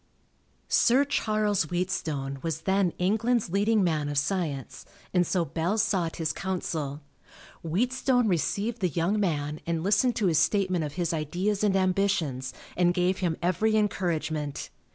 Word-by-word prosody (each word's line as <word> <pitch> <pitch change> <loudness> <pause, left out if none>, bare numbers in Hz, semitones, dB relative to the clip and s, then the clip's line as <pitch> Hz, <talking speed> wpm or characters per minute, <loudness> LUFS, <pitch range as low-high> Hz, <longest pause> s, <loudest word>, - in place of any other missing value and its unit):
Sir 260 +4 +4
Charles 215 - +1
Wheatstone 155 -7 -2
was 165 -3 -3
then 190 -2 +2
England's 220 +2 +1
leading 205 +2 +2
man 155 -4 0
of 145 - -3
science, 145 -4 -2 0.3
and 180 -2 +3
so 180 -3 +1
Bell 170 +6 -1
sought 185 -6 0
his 160 -2 -2
counsel. 160 -6 -3 0.6
Wheatstone 245 - +1
received 205 +6 -1
the 180 - +2
young 170 +7 0
man 150 -5 -1
and 165 -1 -1
listened 230 +5 +2
to 215 - 0
his 165 -4 +3
statement 185 0 +1
of 145 -1 -4
his 170 0 -1
ideas 180 +7 -1
and 200 -2 +3
ambitions 185 -9 0 0.2
and 175 0 +2
gave 180 +1 +1
him 170 -4 -1
every 215 +5 +2
encouragement. 160 -8 -2
180 Hz, 145 wpm, -27 LUFS, 160-205 Hz, 0.6 s, Sir